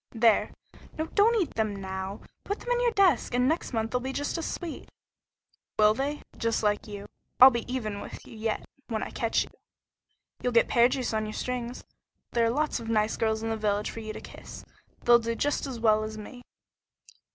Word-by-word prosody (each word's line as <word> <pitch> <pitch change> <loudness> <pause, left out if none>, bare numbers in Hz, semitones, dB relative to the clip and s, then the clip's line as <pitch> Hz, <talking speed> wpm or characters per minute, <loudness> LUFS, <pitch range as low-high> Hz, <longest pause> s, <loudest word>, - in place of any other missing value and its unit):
"There! 225 -1 +4 0.5
No, 315 - -1
don't 435 +6 +3
eat 360 - -1
them 215 -2 0
now. 190 0 -5 0.2
Put 405 - -3
them - - -4
in 485 0 +2
your - - +4
desk, 365 - +3
and 250 +1 +3
next 320 +4 0
month 225 -2 -1
they'll 250 - +1
be 260 +2 -4
just 285 +2 -2
as 330 - -3
sweet!" 340 -3 -6 0.9
"Will 215 0 +6
they? 280 +5 -3 0.2
Just 230 -1 0
like 210 0 +1
you? 205 -1 -7 0.3
I'll 260 +1 +11
be 235 0 -3
even 215 -6 -3
with - - -9
you - - -12
yet 220 0 -2 0.2
when 220 -3 -2
I - - -6
catch 230 -1 +1
you." - - -14 0.9
"You'll 250 - 0
get 230 - +5
pear 240 0 +5
juice 255 -3 -2
on 215 0 0
your 215 - -5
strings. 250 0 -4 0.5
There 235 -1 +3
are - - +2
lots 295 +3 0
of 230 -1 -7
nice 215 -1 +2
girls 220 0 0
in 225 - -1
the 225 - -1
village 210 -1 0
for - - -7
you 215 -1 -5
to - - -8
kiss. - - -11 0.4
They'll 240 0 +7
do 230 0 -2
just 290 +3 0
as 255 -3 -5
well 215 -1 +4
as 215 0 -5
me." 230 +4 -9
230 Hz, 210 wpm, -28 LUFS, 215-260 Hz, 0.9 s, I'll